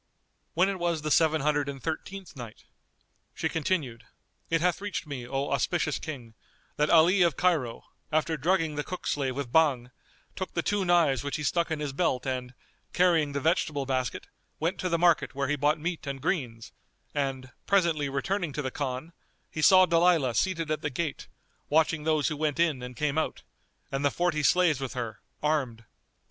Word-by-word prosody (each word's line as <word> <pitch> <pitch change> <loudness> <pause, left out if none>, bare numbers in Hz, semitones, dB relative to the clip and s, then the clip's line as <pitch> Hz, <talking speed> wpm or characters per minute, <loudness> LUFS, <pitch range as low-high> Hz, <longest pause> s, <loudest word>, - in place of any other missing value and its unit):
When 180 +3 +4
it 195 -1 -2
was 170 -3 -1
the 155 - -2
Seven 160 -1 +4
Hundred 145 0 +1
and 135 -1 -6
Thirteenth 175 +5 -5
Night, 120 -4 -9 0.7
She - - -1
continued, 150 -7 -2 0.5
It 165 - +2
hath 180 +2 +1
reached 205 -5 -4
me, 135 -5 -6
O 135 +2 -2
auspicious 155 +3 0
King, 125 -8 -7 0.4
that 150 +1 +1
Ali 175 +4 +5
of 170 -6 +3
Cairo, 155 -11 +1 0.3
after 155 +1 +1
drugging 165 +1 +1
the 150 0 -2
cook 185 - -7
slave 135 -3 -1
with 140 -4 -4
Bhang, 135 -6 +3 0.4
took 185 - -5
the 170 - 0
two 205 -2 0
knives 165 -8 +3
which 145 - -3
he 150 - -3
stuck 170 +4 +1
in 160 -2 -2
his 145 -2 -3
belt 135 -5 0
and, 125 -1 -3 0.4
carrying 165 -5 +3
the 140 - -1
vegetable 150 -2 0
basket, 130 -2 -2 0.3
went 165 +4 -1
to 185 - -1
the 170 - +2
market 170 -4 +3
where 140 0 -1
he 150 - +1
bought 145 +2 +2
meat 165 -1 -4
and 140 -1 -4
greens; 125 - -3 0.4
and, 135 -3 -2 0.2
presently 170 -7 +2
returning 165 +5 -1
to 150 - -3
the 130 - -3
Khan, 140 +4 -4 0.4
he 155 - -4
saw 185 +4 +7
Dalilah 165 -6 +3
seated 165 -4 0
at 155 - -1
the - - -1
gate, 150 +1 -4 0.4
watching 155 0 +2
those 155 -3 +2
who 155 - -4
went 155 0 -1
in 160 -6 +2
and 125 0 -8
came 150 0 0
out, - - -3 0.5
and 135 +1 -2
the 145 - +4
forty 170 0 0
slaves 165 -2 +3
with 135 - -4
her, 115 -3 -5 0.2
armed. 130 -7 -1
150 Hz, 185 wpm, -28 LUFS, 135-170 Hz, 0.7 s, saw